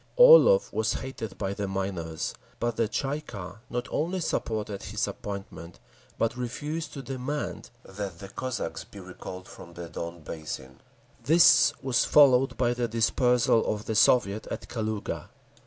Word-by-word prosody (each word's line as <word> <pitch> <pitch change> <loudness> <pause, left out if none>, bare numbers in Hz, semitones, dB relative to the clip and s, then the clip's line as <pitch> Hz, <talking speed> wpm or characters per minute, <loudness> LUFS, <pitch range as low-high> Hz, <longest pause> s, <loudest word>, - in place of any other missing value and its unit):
Orlov - - +8
was 110 0 +1
hated 115 -6 -6
by 100 -1 -2
the 100 0 -3
miners. 95 -5 -3 0.3
But 120 -1 -1
the 115 - +1
Tsay 135 +6 -2
ee - - -8
kah 100 -9 -8
not 120 +1 -3
only 175 +5 -1
supported 110 - -2
his - - -2
appointment, 95 -5 -7 0.4
but 115 +1 0
refused 150 +6 -4
to 140 - -7
demand 135 +3 -4 0.2
that 95 -2 -6
the 100 +2 -9
Cossacks 130 +5 -4
be 100 - -13
recalled 90 0 -9
from 85 0 -12
the 85 -1 -7
Don 85 +1 -6
Basin…. 75 -5 -7 0.4
This 155 -2 +6
was 130 -3 +2
followed 135 -3 +5
by 120 -1 +2
the 120 -1 -1
dispersal 115 +1 +2
of 105 0 -4
the 110 - -2
Soviet 110 -1 +3
at - - -6
Kaluga. 110 -3 -4
110 Hz, 155 wpm, -27 LUFS, 95-130 Hz, 0.4 s, Orlov